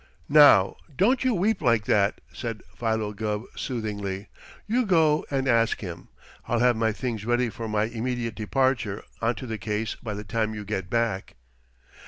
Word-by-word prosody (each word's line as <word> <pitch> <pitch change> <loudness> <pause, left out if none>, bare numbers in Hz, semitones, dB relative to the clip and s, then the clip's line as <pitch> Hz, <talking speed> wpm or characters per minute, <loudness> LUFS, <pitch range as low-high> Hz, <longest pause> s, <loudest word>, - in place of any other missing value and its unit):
"Now, 145 -10 +7 0.2
don't 240 - +3
you 255 -3 +2
weep 200 +3 +1
like 115 -3 +2
that," 100 -1 +2
said 115 -3 -5
Philo 110 -2 -1
Gubb 105 +1 -2
soothingly. 105 -5 -4 0.4
"You 240 +4 +1
go 160 -4 +3
and 135 -1 -1
ask 115 -2 +2
him. 85 -4 -7 0.4
I'll 120 - +1
have 120 +1 +4
my 110 0 +1
things 115 -1 -4
ready 120 +1 +1
for 115 -1 -6
my 105 0 +1
immediate 115 +1 -2
departure 110 -2 0 0.2
onto 115 +3 -1
the 110 -2 -4
case 105 +1 -2
by 105 -3 -6
the 105 - -6
time 110 +1 -1
you 105 -1 -6
get 95 -3 -3
back." 115 -5 -1
115 Hz, 165 wpm, -26 LUFS, 105-130 Hz, 0.4 s, Now